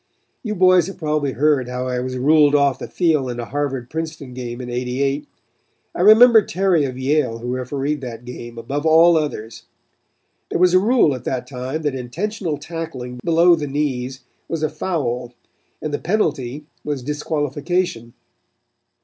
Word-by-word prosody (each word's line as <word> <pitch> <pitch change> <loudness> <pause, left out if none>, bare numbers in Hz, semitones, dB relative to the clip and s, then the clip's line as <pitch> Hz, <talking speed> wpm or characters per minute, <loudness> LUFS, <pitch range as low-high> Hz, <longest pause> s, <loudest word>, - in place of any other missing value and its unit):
You 215 -3 -3
boys 185 -2 +5
have 195 - -8
probably 150 -4 -1
heard 140 -2 +2
how 125 +1 -3
I 125 -1 -1
was 130 +1 -4
ruled 145 +2 +4
off 140 -2 +2
the - - -6
field 155 -7 +1
in 120 0 -5
a 120 - -3
Harvard 135 -2 -3
Princeton 155 -3 -6
game 120 -1 -6
in 125 - -6
'88. 130 +4 -2 0.7
I - - -3
remember 220 +3 +8
Terry 185 -5 +1
of 130 -2 -5
Yale 130 -3 0
who 120 +2 -5
refereed 135 +3 -2
that 120 -2 -7
game, 120 -1 -9
above 135 +6 -3
all 165 +2 +6
others. 115 -8 -3 0.8
There - - -1
was 180 0 +4
a 185 - +7
rule 215 - +3
at 130 - -7
that 125 -1 -2
time 130 +4 -5
that 145 -2 0
intentional 165 - -3
tackling 145 -6 -6
below 170 +1 +5
the 150 -3 -4
knees 135 -2 -2 0.3
was 165 -2 -3
a 155 - +2
foul 125 -7 -3 0.5
and 155 -1 -3
the 145 - -1
penalty 150 - -1 0.2
was 145 -4 -3
disqualification. 145 -2 -2
145 Hz, 165 wpm, -20 LUFS, 125-160 Hz, 0.8 s, remember